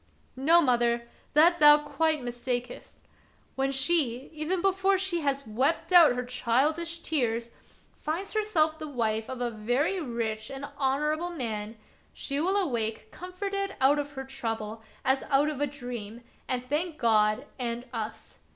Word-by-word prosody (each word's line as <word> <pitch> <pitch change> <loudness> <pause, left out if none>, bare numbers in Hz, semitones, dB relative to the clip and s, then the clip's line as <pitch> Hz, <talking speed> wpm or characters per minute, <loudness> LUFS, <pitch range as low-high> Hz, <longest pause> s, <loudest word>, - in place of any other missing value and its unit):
" - - -37
No, 320 +6 +5
mother, 240 -2 +2 0.3
that 340 +4 +5
thou 295 0 +9
quite 305 0 0
mistakest. 245 0 -4 0.6
When 270 0 0
she, 270 -3 +1
even 315 +4 -2
before 385 +1 +2
she 370 -2 -1
has 280 -1 -1
wept 280 - 0
out 330 -8 +8
her 250 0 -3
childish 300 +8 0
tears, 235 -6 -1 0.5
finds 340 +6 -3
herself 320 -8 +1
the 310 - -5
wife 225 -5 -1
of 260 -1 -5
a 240 -1 -1
very 245 - 0
rich 230 -4 -3
and 275 +1 -6
honorable 300 +5 0
man, 225 -8 -4 0.4
she 280 0 -3
will 380 +4 +1
awake 225 - -2
comforted 395 +2 -4
out 275 +3 +4
of 290 0 -4
her 265 -1 -6
trouble 225 -4 -4 0.2
as 265 0 +2
out 285 +1 +3
of 290 -2 -5
a 290 - +2
dream, 245 -5 -7 0.2
and 250 -1 -2
thank 310 +4 -1
God 215 +1 +2
and 240 0 -3
us. 225 -1 -6
270 Hz, 150 wpm, -28 LUFS, 235-320 Hz, 0.6 s, thou